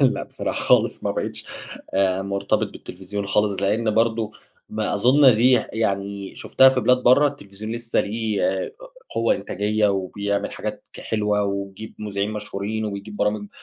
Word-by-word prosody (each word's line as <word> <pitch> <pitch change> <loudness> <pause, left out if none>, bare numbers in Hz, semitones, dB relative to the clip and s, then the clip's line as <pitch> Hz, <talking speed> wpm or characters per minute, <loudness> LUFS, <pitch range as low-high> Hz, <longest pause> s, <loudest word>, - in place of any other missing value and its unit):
لأ 135 -3 +3
بصراحة - - -4
خالص، - - +2
ما - - +1
بقيتش - - -4 0.5
آآ، 95 0 +2
مرتبط 100 +2 0
بالتلفزيون 100 +2 -6
خالص، 105 -1 +1
لأن 110 +3 +1
برضو 115 -1 +1 0.4
ما 110 -1 -2
أظن 130 +4 +6
دي 125 +4 +4 0.2
يعني 100 -2 -2
شفتها 130 0 +5
في 130 -1 +1
بلاد 125 +1 +3
برّا 145 +4 +6
التلفزيون 110 -5 -8
لسه 115 0 0
ليه 110 -2 0 0.6
قوة 115 0 +2
إنتاجية 105 +2 0
وبيعمل 100 +1 -1
حاجات - - -5
ك - - -10
حلوة، 105 -1 0
ويجيب 100 +2 -5
مذيعين 105 -1 -2
مشهورين، 105 +1 -4
وبيجيب 105 0 -6
برامج 105 0 -1
105 Hz, 145 wpm, -23 LUFS, 100-115 Hz, 0.6 s, أظن